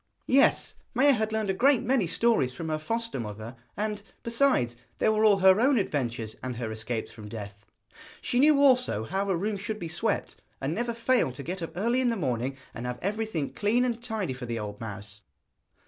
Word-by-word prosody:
Yes, 270 +2 +3 0.2
Maia 280 +4 +6
had 220 -4 0
learned 220 -2 0
a - - -1
great 255 +5 +3
many 245 -6 +2
stories 200 - +2
from 165 +2 -5
her 155 0 -1
foster 230 - -2
mother, 110 +2 -6 0.2
and, 210 0 -2 0.2
besides, 230 - +2 0.2
there - - +3
were 215 0 +2
all 210 -2 +6
her 190 +1 +6
own 265 +1 +4
adventures, 120 - -2
and 130 -1 -4
her 115 -2 -4
escapes 110 +1 -4
from 110 -2 -10
death. 105 -1 -8 0.5
She 245 - 0
knew 295 +1 +6
also 250 - +4
how 195 - -2
a 185 - +2
room 205 +3 -1
should 210 +2 -4
be 175 - -5
swept, 160 - -2 0.2
and 135 +4 -2
never 235 +4 -2
failed 230 - +1
to 140 - -6
get 180 +4 -4
up 165 -1 -5
early 235 +6 +2
in 250 - +2
the 230 - 0
morning 130 -4 -2 0.2
and 125 +1 -5
have 125 0 -3
everything 205 -7 -2
clean 230 +5 +2
and 235 -2 -2
tidy 220 - -2
for 125 -1 -7
the 115 0 -3
old 105 -1 -6
mouse. 105 -1 -7
190 Hz, 205 wpm, -28 LUFS, -, 0.5 s, Maia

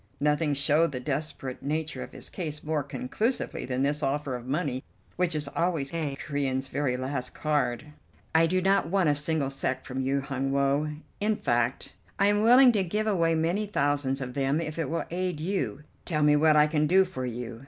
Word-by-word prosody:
Nothing 150 0 +1
showed 150 +3 +3
the 125 - -3
desperate 135 -1 -4
nature 155 +2 -2
of - - -7
his - - -7
case 155 -5 -5
more 155 -1 0
conclusively 145 - -2
than 130 +1 -1
this 145 +1 +1
offer 140 -1 -1
of 120 0 -8
money, 135 -3 -1 0.3
which 175 -2 0
is 150 -1 -2
always 165 -4 -1
a 155 -4 -2
Corean's 135 -2 -2
very 135 -3 -1
last 130 0 -3
card. 145 -6 0 0.5
"I 165 0 +5
do 185 +2 0
not 195 -3 +3
want 185 -3 +2
a - - +4
single 145 -1 0
sek 130 -1 -2
from 130 -1 -3
you, 135 +1 0
Hun 135 0 -2
Woe; 140 +2 +1 0.3
in 215 +1 +1
fact 120 - -1 0.2
I 200 - +3
am 205 0 +2
willing 245 +3 +7
to 205 -4 +1
give 210 +5 -1
away 170 -6 +2
many 175 +6 0
thousands 140 -6 0
of 125 -1 -5
them 140 +2 +1
if 160 -1 -4
it 155 -5 -1
will 165 0 -2
aid 180 -2 -2
you. 150 - -2 0.2
Tell 155 -4 0
me 150 0 +5
what 155 +1 +4
I 150 0 +6
can 150 0 +1
do 190 +4 +5
for 130 -9 -5
you. 120 -1 -6
150 Hz, 200 wpm, -27 LUFS, 135-165 Hz, 0.5 s, willing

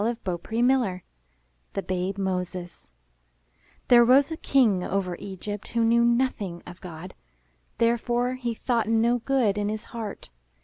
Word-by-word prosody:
418 220 -3 -3
IN 245 - +5
THE 260 - +6
NURSERY 195 -9 -1 0.7
THE 195 - -2
BABE 185 +1 -2
MOSES 180 - -4 1.0
There 240 -1 +7
rose 270 +5 +5
a 320 - -3
King 225 -13 +2
over 185 -2 -2
Egypt 200 +1 -6
who 230 0 0
knew 235 +1 +4
nothing 235 -7 0
of 175 0 -11
God. 175 0 -9 0.6
Therefore 240 +1 +1
he 245 -3 -3
thought 230 -2 0
no 230 +2 +3
good 235 -5 +1
in 205 0 -1
his 215 +1 -4
heart. 220 - -6
220 Hz, 145 wpm, -26 LUFS, 185-240 Hz, 1.0 s, There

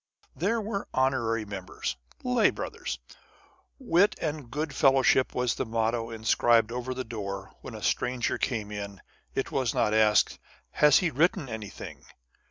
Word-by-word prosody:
There 215 +7 0
were 210 -2 -3
honorary 120 -4 +1
members, 95 -8 -5 0.3
lay 250 -3 +4
brothers. - - -5 0.8
Wit 205 - +3
and 150 -5 -3
good 150 +3 -3
fellowship 135 -1 +4
was 125 -2 +1
the - - -2
motto 115 0 0
inscribed 115 0 +3
over 125 +1 -3
the 130 - -3
door. 100 -4 -6
When - - -8
a - - -8
stranger 125 -1 0
came 110 -5 -2
in, 100 -1 -6 0.3
it 135 - -1
was 130 -4 0
not 105 - +2
asked, 110 -1 +4 0.3
"Has 150 -2 +6
he 175 -3 +1
written 150 0 +2
anything?" 110 -3 -8
125 Hz, 145 wpm, -28 LUFS, 110-150 Hz, 0.8 s, Has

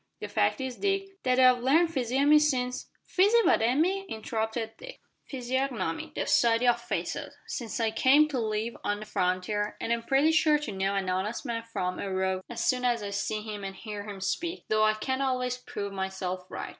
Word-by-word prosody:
The - - -5
fact - - +1
is, 260 -2 -4
Dick, 390 -1 -2
that 255 0 +2
I've 255 -1 +6
learned 320 +6 +3
physiognomy 275 +3 +4
since 255 -4 0
" - - -51
"Fizzi 410 +6 +5
what 360 - +4
umy?" 330 - +1
interrupted 220 -2 -3
Dick. - - -10 0.3
"Physiognomy 250 - -2
the - - -1
study 235 +1 +3
o' 240 - +7
faces 235 0 -4
since 235 -3 -4
I 225 -1 +1
came 270 +7 +5
to 270 -4 -2
live 220 +1 -2
on 205 0 -1
the - - -6
frontier, 205 +2 -1
an' 230 - -3
I'm 235 0 +1
pretty 275 +6 +3
sure 310 -1 +4
to 295 -7 -5
know 195 0 -1
an 195 -1 -1
honest 190 +5 -2
man 230 -1 -2
from 185 -6 -3
a 195 - -3
rogue 190 0 0
as 240 - -3
soon 250 -1 +1
as 240 -3 +1
I 200 - -4
see 210 +1 -2
him 210 -2 -6
an' 195 0 -5
hear 210 -1 -7
him 195 -2 -7
speak 340 - -3
though 215 0 +3
I 215 0 +4
can't 260 +5 -2
always 250 -2 0
prove 200 -5 -6
myself 190 -1 -4
right." - - -5
235 Hz, 205 wpm, -28 LUFS, 205-270 Hz, 0.3 s, o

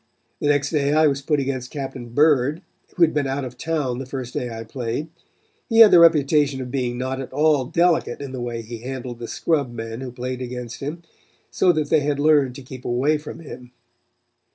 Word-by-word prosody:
The - - -1
next 145 -1 +2
day 145 -2 +1
I 155 +1 +5
was 140 -2 +1
put 150 +1 +1
against 130 -2 -3
Captain 135 -4 -6
Bird, 145 +4 +2 0.3
who 175 - +4
had 160 - +4
been 145 -2 0
out 135 0 -2
of 125 -1 -8
town 140 -4 -2
the 135 - -6
first 130 -2 -6
day 125 - -3
I 115 -1 -6
played. 120 +5 -4 0.6
He 225 - +1
had 220 - +9
the 175 - +8
reputation 150 -4 +4
of 125 -1 -6
being 125 -3 -2
not 130 +1 -3
at 130 - -8
all 145 -1 +2
delicate 170 +5 +1
in 140 -2 -6
the 130 -2 -5
way 120 -1 -4
he 115 +1 -8
handled 125 -1 -6
the 120 - -6
scrub 145 -4 0
men 115 0 -6
who 130 -2 -6
played 125 +1 -5
against 125 -1 -6
him, 155 +5 -6 0.5
so 180 - +3
that 155 -2 -2
they 160 - +5
had 145 0 -1
learned 145 -4 +3
to 140 - -9
keep 130 0 -10
away 135 +6 +1
from 150 +2 -9
him. 125 -5 -11
135 Hz, 215 wpm, -22 LUFS, 125-150 Hz, 0.6 s, had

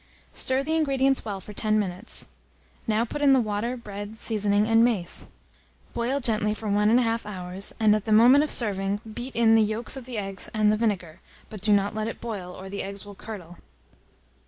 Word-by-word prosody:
Stir 260 +1 +2
the 315 +3 -1
ingredients 270 -3 +1
well 200 -3 -4
for 210 +3 -11
10 215 +1 0
minutes. 195 +1 -1 0.6
Now 220 +1 +1
put 290 +5 -6
in 280 -2 +5
the 265 - +5
water, 225 +2 -2
bread, 205 -1 -8
seasoning, 210 -2 +1
and 225 0 +4
mace. 215 -8 0 0.7
Boil 245 +4 -1
gently 215 -4 0
for 220 - -7
1 210 +1 +2
1/2 230 -1 +2
hour, 180 -3 -7 0.3
and, 215 -1 +4
at 215 - -3
the 220 - -2
moment 245 +7 +6
of 305 - -2
serving, 200 -2 +3
beat 245 +4 -7
in 230 -1 +4
the 225 - +5
yolks 220 +4 0
of 265 -3 -8
the 245 -3 -6
eggs 195 -2 -4
and 215 -1 +3
the - - +2
vinegar, 190 -7 -2 0.3
but 210 -3 -8
do 210 +1 +1
not 200 0 +2
let 215 0 -3
it 230 - -6
boil, 205 -6 -6
or 190 +1 -10
the 200 +1 -5
eggs 200 +1 -7
will 205 - -10
curdle. 190 -5 -10
215 Hz, 205 wpm, -25 LUFS, 205-235 Hz, 0.7 s, moment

